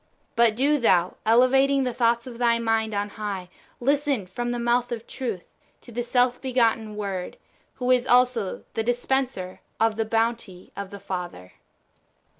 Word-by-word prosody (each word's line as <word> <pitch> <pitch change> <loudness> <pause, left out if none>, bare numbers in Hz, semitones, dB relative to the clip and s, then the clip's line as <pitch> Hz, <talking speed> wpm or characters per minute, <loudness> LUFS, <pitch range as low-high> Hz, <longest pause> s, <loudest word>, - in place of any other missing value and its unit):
But 230 -2 +4
do 285 +5 +2
thou, 185 -7 +2
elevating 265 +4 +4
the 250 -2 -1
thoughts 235 -1 +1
of 245 -2 -9
thy 235 -1 +3
mind 225 -2 0
on 205 0 -1
high, 200 -4 -5 0.3
listen 280 -4 +1
from 240 +7 -4
the 240 - -1
mouth 240 +1 +1
of 230 -1 -4
Truth 225 -10 -5 0.4
to - - -13
the 240 +1 -2
self 245 +1 +1
begotten 230 -4 +1
Word, 195 -3 -4 0.4
who 250 0 0
is 250 0 +3
also 245 -5 +2
the 225 - -1
dispenser 245 -4 -1 0.2
of 225 -1 +2
the 225 - 0
bounty 225 -4 -2
of 200 -1 -6
the 200 - -9
Father. 175 - -6
235 Hz, 160 wpm, -25 LUFS, 210-250 Hz, 0.4 s, But